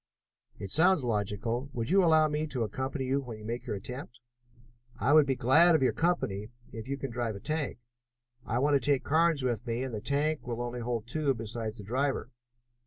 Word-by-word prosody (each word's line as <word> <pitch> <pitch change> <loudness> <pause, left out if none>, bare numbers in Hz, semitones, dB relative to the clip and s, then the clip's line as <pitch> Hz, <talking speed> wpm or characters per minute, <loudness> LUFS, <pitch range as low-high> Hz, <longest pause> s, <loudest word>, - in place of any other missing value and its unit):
"It 95 - -7
sounds 165 - +4
logical. 115 +4 -2
Would 115 +5 -2
you 195 0 +5
allow 160 -2 +5
me 150 +1 -2
to 130 -5 -2
accompany 130 +4 -3
you 135 +2 0
when 120 -5 -8
you 105 - -11
make 115 +2 -5
your - - -2
attempt?" 125 +4 -8 0.8
"I 140 - +3
will 155 -2 +7
be 135 -1 0
glad 150 +8 +5
of 155 - +2
your 130 - +3
company, 130 - -1 0.2
if 115 +1 -7
you 140 +1 -2
can 135 -2 -5
drive 115 -2 -2
a - - -7
tank. 155 +3 -2 0.7
I 115 - -2
want 145 +3 +2
to 140 - +5
take 140 +1 +1
Carnes 160 -2 +2
with 120 -1 -2
me, 120 +2 -1
and 130 -2 -5
the 105 - -4
tank 145 +3 -1
will 120 -1 -3
only 120 0 -4
hold 120 -2 -3
two 140 +2 0
besides 115 0 -5
the 105 - -9
driver." 130 +6 -1
130 Hz, 210 wpm, -30 LUFS, 115-145 Hz, 0.8 s, will